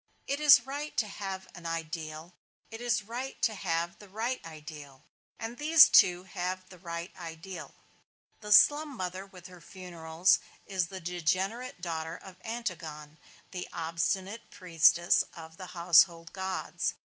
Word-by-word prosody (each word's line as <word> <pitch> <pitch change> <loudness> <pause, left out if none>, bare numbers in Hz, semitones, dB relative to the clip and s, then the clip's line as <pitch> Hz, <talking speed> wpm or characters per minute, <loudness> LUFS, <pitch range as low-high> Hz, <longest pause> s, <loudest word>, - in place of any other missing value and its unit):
It 280 +1 -2
is 290 -5 +7
right 290 +3 -5
to 220 - +2
have 195 -2 -6
an 175 -2 -8
ideal, 165 0 -5 0.4
it 225 +1 -8
is 235 -2 0
right 245 +5 -6
to 225 - +3
have 170 -3 -2
the 205 - -14
right 230 +6 -3
ideal, 150 -4 -11 0.3
and 230 +2 -6
these 310 +1 +8
two 180 0 +6
have 185 0 -4
the 180 - -14
right 170 0 -6
ideal. 170 +1 -8 0.6
The 210 -1 -7
slum 290 +4 +6
mother 185 +1 -4
with 180 -2 -15
her 180 -2 -12
funerals 170 -1 0 0.3
is 185 -3 -1
the 190 +1 -8
degenerate 185 - -2
daughter 165 -1 -4
of 190 -1 -13
Antigone, 160 -10 -6 0.3
the 180 -1 -5
obstinate 185 +6 -2
priestess 170 -1 +3
of 160 0 -11
the 185 - -8
household 170 0 +4
gods. 190 -1 -3
185 Hz, 145 wpm, -30 LUFS, 165-210 Hz, 0.6 s, these